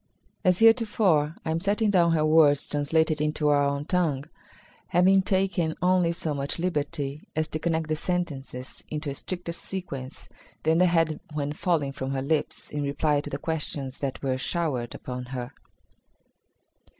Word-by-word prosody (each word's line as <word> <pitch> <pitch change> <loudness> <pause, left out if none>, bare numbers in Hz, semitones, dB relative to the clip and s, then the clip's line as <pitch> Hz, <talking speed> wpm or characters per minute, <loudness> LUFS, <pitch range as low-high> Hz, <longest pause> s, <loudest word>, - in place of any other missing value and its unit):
As 180 -3 +4
heretofore, 210 -9 +4
I 160 - 0
am 160 - 0
setting 205 +3 +1
down 170 -3 +4
her 155 -1 +2
words 155 -2 +5
translated 155 +1 +1
into 150 0 +1
our 145 -1 +4
own 140 +1 -1
tongue, 155 -6 0 0.6
having 190 +3 +4
taken 185 -4 0
only 180 -2 +3
so 165 -2 -2
much 140 0 -2
liberty 150 -4 -2
as 155 0 0
to 155 - -3
connect 160 -1 0
the 155 - 0
sentences 145 -7 -4
into 150 -1 -3
a - - -4
stricter 175 +4 -5
sequence 160 -7 -6 0.4
than 160 +1 +3
they 180 - +5
had 165 -2 +2
when 145 -1 -2
falling 155 -4 0
from 135 0 -4
her 135 - -1
lips 150 +1 -1
in 150 - -2
reply 145 +1 +1
to - - -7
the - - -3
questions 145 -4 -3
that 140 -1 -4
were 130 -1 0
showered 135 -6 -2
upon 125 -1 -6
her. 125 -1 -6
155 Hz, 160 wpm, -26 LUFS, 140-175 Hz, 0.6 s, words